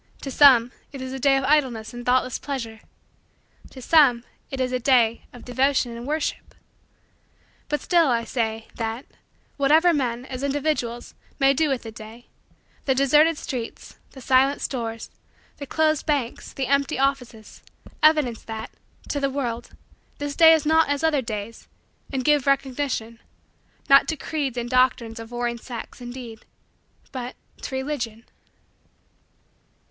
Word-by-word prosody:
To 275 - -4
some, 250 -4 +6 0.2
it 275 - -8
is 260 0 -6
a 265 - -5
day 270 +1 +4
of 270 - -1
idleness 260 -6 +1
and 240 0 -7
thoughtless 255 0 +1
pleasure. 235 -6 -5 0.9
To 260 - -11
some, 265 -7 +5 0.3
it 270 - -6
is 255 -1 0
a 255 - -1
day 235 -3 +2
of 245 - -13
devotion 255 -1 +1
and 235 +2 -8
worship. 305 +1 -3 1.1
But 295 - -1
still, 340 -3 +3
I 235 -3 +1
say, 225 -2 -3
that, 225 +3 -4 0.5
whatever 315 +5 +4
men, 250 -4 -2
as 260 -1 -6
individuals, 275 -4 -2 0.2
may 275 -1 +4
do 305 +2 +1
with 270 -3 -1
the 225 - -7
day, 220 +2 -12 0.6
the 265 - +2
deserted 295 +4 +4
streets, 245 -6 -7
the 265 - -11
silent 265 +2 +3
stores, 230 -3 -4 0.5
the 285 - -7
closed 315 0 +1
banks, 280 -6 -2
the 270 - -3
empty 280 +1 +1
offices, 255 -5 -2 0.4
evidence 300 -7 +3
that, 220 0 -7 0.4
to 285 - -1
the 275 -1 0
world, 240 -4 -4 0.5
this 290 0 -4
day 325 -1 +8
is 315 -2 +1
not 320 0 +3
as 285 +1 -1
other 310 -4 +2
days 220 -1 -6 0.4
and 260 -2 -2
give 295 -2 +3
recognition 265 -4 -1 0.7
not 275 0 +6
to 315 - -2
creeds 280 -4 -3
and 240 +1 -3
doctrines 255 -3 +2
of 225 0 -9
warring 240 0 -3
sects 240 +1 -9
indeed 245 -2 -9 0.7
but, 255 -2 -6 0.3
to 265 - -5
Religion. 245 -5 -4
260 Hz, 150 wpm, -24 LUFS, 235-285 Hz, 1.1 s, day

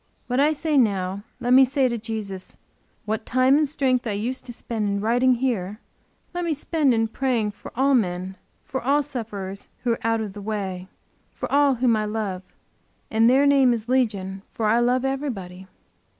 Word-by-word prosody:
What 250 +1 -1
I 295 +2 +4
say 310 -1 +1
now, 195 -4 0 0.2
let 245 +1 +1
me 265 +1 +8
say 265 0 +2
to 240 - -2
Jesus. 215 -4 -6 0.5
What 220 +1 -2
time 255 +3 +3
and 300 -1 +2
strength 255 -4 0
I 215 - -1
used 245 +6 -3
to - - -4
spend 225 -3 -3
in 200 0 -1
writing 245 +4 +3
here, 220 -5 -2 0.5
let 355 0 -2
me 330 -3 0
spend 300 -1 +1
in 225 -1 +2
praying 230 -3 -1
for - - -12
all 275 +3 +3
men, 185 -5 0 0.3
for 265 - -4
all 285 +3 +3
sufferers 210 -8 -6
who 245 - +1
are 230 - -1
out 225 0 +1
of 210 -3 -5
the 205 - -8
way, 195 -3 -4 0.4
for - - -6
all 280 -1 +4
whom 240 -1 +2
I 215 0 0
love. 210 -4 -3 0.7
And 225 +1 +4
their 270 +3 +4
name 275 -3 +5
is 230 -1 -4
Legion 205 -7 0
for 225 - -3
I 220 +2 +4
love 250 +2 +2
everybody. 200 -10 -4
235 Hz, 190 wpm, -24 LUFS, 205-265 Hz, 0.7 s, me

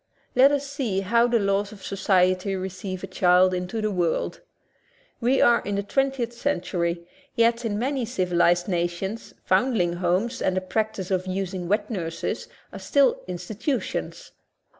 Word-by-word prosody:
Let 265 +3 +6
us 285 -1 0
see 260 -9 -2
how 235 +5 +3
the 240 -1 +2
laws 200 0 0
of 200 -3 -13
society 185 0 +1
receive 185 0 -5
a - - -1
child 185 0 +4
into 180 +5 -3
the 215 0 0
world. 175 -4 -1 0.8
We 255 +3 +2
are 235 - +5
in 205 - -3
the 200 - -1
twen 270 +6 +1
tieth 240 -3 -4
century, 175 -9 -2 0.3
yet 235 0 +2
in 205 -2 -1
many 260 +2 -1
civilized 175 -5 +2
nations 175 +4 -3
foundling 190 -4 +2
homes 185 +8 0
and 185 0 +1
the - - +1
practice 195 0 -2
of 185 0 0
using 185 -1 -3
wet 210 +5 0
nurses 165 -6 -3 0.3
are - - -7
still 275 -3 +2
institutions. 200 - -4
195 Hz, 155 wpm, -25 LUFS, 180-235 Hz, 0.8 s, Let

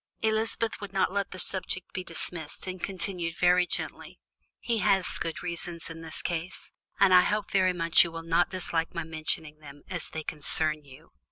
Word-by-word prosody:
Elizabeth 220 0 0
would 205 -2 -6
not 190 -1 +2
let 200 0 0
the 185 - -8
subject 185 0 +1
be 185 - -3
dismissed, 160 -4 -4
and 185 -1 -5
continued 180 -3 -3
very 180 0 +4
gently: - - -4 0.4
"He 230 -2 0
had 195 -2 +3
good 165 +1 -3
reasons 170 -1 -3
in 165 0 -8
this 160 -1 -6
case, 170 +1 -4 0.3
and 195 -2 +6
I 180 - +9
hope 210 +2 -1
very 185 -1 +4
much 165 -2 +6
you 170 - -4
will 165 0 -6
not 165 +1 +2
dislike 170 -3 -2
my 170 - -1
mentioning 155 -1 -3
them, 145 -1 -13
as 180 -2 -2
they 160 - -5
concern 155 0 +1
you. 135 -2 -16
175 Hz, 185 wpm, -28 LUFS, 165-185 Hz, 0.4 s, I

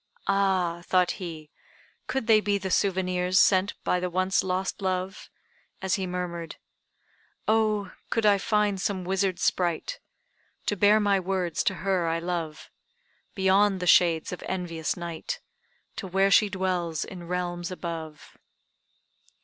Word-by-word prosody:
"Ah," 190 -4 +1
thought 180 -1 +3
he, 160 -4 -7 0.6
"could 265 -4 -2
they 220 -1 +5
be 205 -1 +1
the 190 -1 -4
souvenirs 185 -1 +1
sent 190 +1 +4
by 180 - +1
the 180 0 -2
once 185 +2 +1
lost 190 +2 -2
love," 185 0 -3 0.5
as 190 -1 -1
he 190 -2 0
murmured 175 -2 -4 0.9
"Oh, 215 -3 +2 0.2
could 225 -2 0
I 205 -1 +5
find 205 -1 +1
some 190 -2 -1
wizard 190 0 0
sprite, 180 - 0 0.7
To 205 - 0
bear 205 +2 +5
my 200 -2 +3
words 185 -2 -1
to 190 - +1
her 185 -3 +1
I 165 0 +1
love, 165 -3 -4 0.6
Beyond 195 0 +3
the 180 - -3
shades 170 -2 +4
of 180 - -6
envious 170 -4 -3
night, 170 - -5 0.6
To 195 - -4
where 195 +2 +2
she 210 +1 +5
dwells 180 -4 -1
in 175 -3 -9
realms 175 -1 -3
above!" 165 -4 -7
185 Hz, 140 wpm, -27 LUFS, 175-195 Hz, 0.9 s, they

